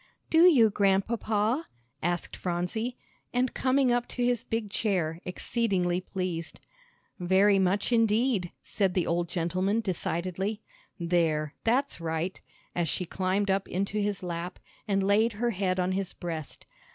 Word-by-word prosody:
"Do 330 +2 +7
you, 235 -11 +6
Grandpapa?" 210 +6 +1 0.3
asked 175 +1 -1
Phronsie, 185 +8 -2 0.3
and 250 0 +1
coming 260 -1 +2
up 240 0 +1
to 245 - -3
his 245 -2 +1
big 225 -3 -3
chair, 175 -7 -1
exceedingly 180 -2 0
pleased. 180 -3 -4 0.6
"Very 190 +3 +4
much 190 +4 +1
indeed," 225 -4 +2
said 195 -3 0
the 180 -3 +2
old 170 0 0
gentleman, 185 +5 0
decidedly. 190 +1 -2 0.4
"There, 165 -3 +1
that's 255 -2 +1
right," 165 +3 -2 0.3
as 170 -2 0
she 180 - -1
climbed 190 +3 0
up 195 0 0
into 200 +3 -1
his 205 -2 -2
lap, 175 0 -4 0.3
and 195 -1 +1
laid 215 +4 +3
her 235 +3 0
head 185 -2 0
on 180 +1 +1
his 190 0 -2
breast. 160 -4 -6
195 Hz, 140 wpm, -28 LUFS, 175-225 Hz, 0.6 s, Do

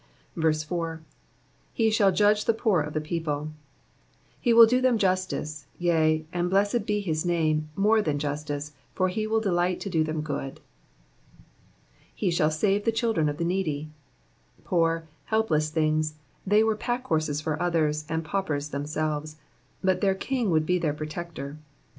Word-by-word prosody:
4. 160 0 -1 0.8
'"Be 225 -3 +3
shall 205 -3 +4
judge 210 +2 +3
the 230 - +2
poor 215 -7 +2
of 150 +1 -5
tJie 155 - -1
people.'''' 155 -2 -3 0.9
He 240 - +1
will 230 0 +10
do 250 +3 +2
them 255 -2 +3
justice, 185 -7 -1
yea, 160 -2 +2
and 175 0 0
blessed 205 +5 +1
be 210 0 +1
his 160 -5 -1
name, 155 -3 0
more 215 +3 +3
than 150 -7 -1
justice, 145 0 -3 0.2
for 185 -1 +2
he 215 +4 -2
will 220 +1 +2
delight 180 -3 0
to 200 - -4
do 160 -3 +2
them 155 0 -2
good. 140 -3 -5 1.6
""He 185 - 0
shall 155 -2 +2
sane 195 +6 +1
the 230 - +2
children 225 -9 +1
of 145 - -4
the 170 - -1
needy,'''' 155 -5 -2 0.7
Poor, 165 -2 +1 0.2
helpless 165 -9 +1
things, 155 -1 0 0.3
they 210 +2 +5
were 220 -1 +2
packhorses 160 - -1
for 155 0 -3
others, 155 -3 +1
and 160 0 -2
paupers 155 -6 -2
themselves, 155 +1 -3 0.5
but 185 -1 +2
their 195 -1 +3
King 245 +1 -1
would 155 -2 +2
be 180 +2 +1
their 155 -3 -1
protector. 155 -1 -6
165 Hz, 155 wpm, -26 LUFS, 155-200 Hz, 1.6 s, will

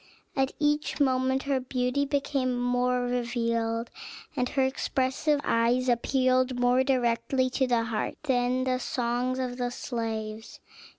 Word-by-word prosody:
At 270 0 +1
each 295 0 0
moment 260 -1 +2
her 275 -2 0
beauty 255 +2 -1
became 275 -3 0
more 245 0 +1
revealed, 230 -2 -1 0.4
and 250 -2 0
her 270 - +1
expressive 265 +2 0
eyes 240 +2 +2
appealed 255 +1 +2
more 245 +1 +4
directly 255 0 +1
to 260 0 +1
the 240 -2 +2
heart 225 -2 -2
than 255 -2 +1
the 255 -1 0
songs 245 +1 -1
of 250 -1 -3
the 245 -1 -1
slaves. 225 -3 -5
250 Hz, 130 wpm, -28 LUFS, 240-260 Hz, 0.4 s, more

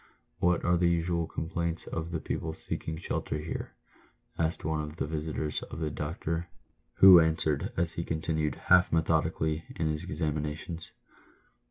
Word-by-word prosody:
" - - -45
What 90 0 +2
are 90 0 +4
the 85 0 +3
usual 85 -1 0
complaints 85 +1 -3
of 80 +1 -4
the 85 -2 -2
people 80 +1 -3
seeking 80 0 -3
shelter 80 -2 -3
here 75 +2 -5 0.3
?" - - -32
asked 80 -1 -1
one 80 0 0
of 75 0 -6
the - - -2
visitors 75 0 -2
of - - -8
the 80 -2 -2
doctor, 80 +3 -3 0.5
who 95 -2 +10
answered, 80 -2 +1
as 85 -1 +3
he 85 - -3
continued, 80 -1 -1
half 90 -1 +4
methodically, 80 -1 +1
his 80 -2 -1
examinations. 75 +2 -3
80 Hz, 155 wpm, -29 LUFS, 75-85 Hz, 0.5 s, who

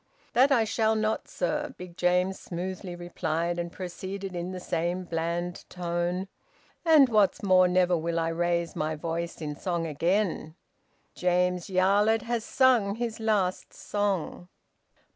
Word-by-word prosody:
"That 265 +3 +5
I 240 -5 +5
shall 220 0 +1
not, 215 0 -1
sir," 175 -2 -2
Big 180 -1 -10
James 180 +2 +1
smoothly 180 +1 -5
replied, 175 -1 -2
and 170 0 -3
proceeded 190 +1 -6
in 175 +1 -3
the 185 - -5
same 175 +1 -2
bland 170 +1 -3
tone: 175 +1 -2 0.6
"And 315 -5 +7
what's 210 -5 +2
more, 185 -2 +5
never 180 0 +3
will 170 0 -2
I 165 0 0
raise 170 0 -1
my 155 +1 -1
voice 170 +2 -4
in 150 -1 -4
song 170 0 -2
again! 165 +1 0 0.6
James 180 0 +1
Yarlett 200 +4 +3
has 235 -1 -2
sung 235 -6 +3
his 230 -1 -3
last 205 -5 0
song." 195 -3 -2
180 Hz, 140 wpm, -28 LUFS, 170-205 Hz, 0.6 s, And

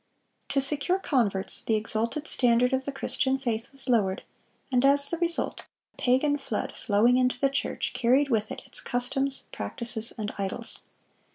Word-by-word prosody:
(635) - - -3
To 275 -1 +3
secure 295 +6 0
converts, 225 - +2
the 225 - 0
exalted 230 +7 -1
standard 245 +1 +4
of 265 0 -1
the 280 - -3
Christian 265 0 0
faith 235 -3 -4
was 275 0 -10
lowered, 205 -6 +1 0.5
and 250 -1 +2
as 280 +1 +4
the 335 - -3
result 340 -1 +3 0.3
"a - - -36
pagan 285 +4 +2
flood, 230 -5 -4
flowing 225 +4 +2
into 250 -1 0
the 275 0 +1
church, 275 - -2
carried 260 +3 +2
with 220 -3 0
it - - -7
its - - +1
customs, 270 +2 -2
practices, 235 -2 -3
and 210 -2 -4
idols." 200 +4 -4
255 Hz, 170 wpm, -26 LUFS, 230-275 Hz, 0.5 s, standard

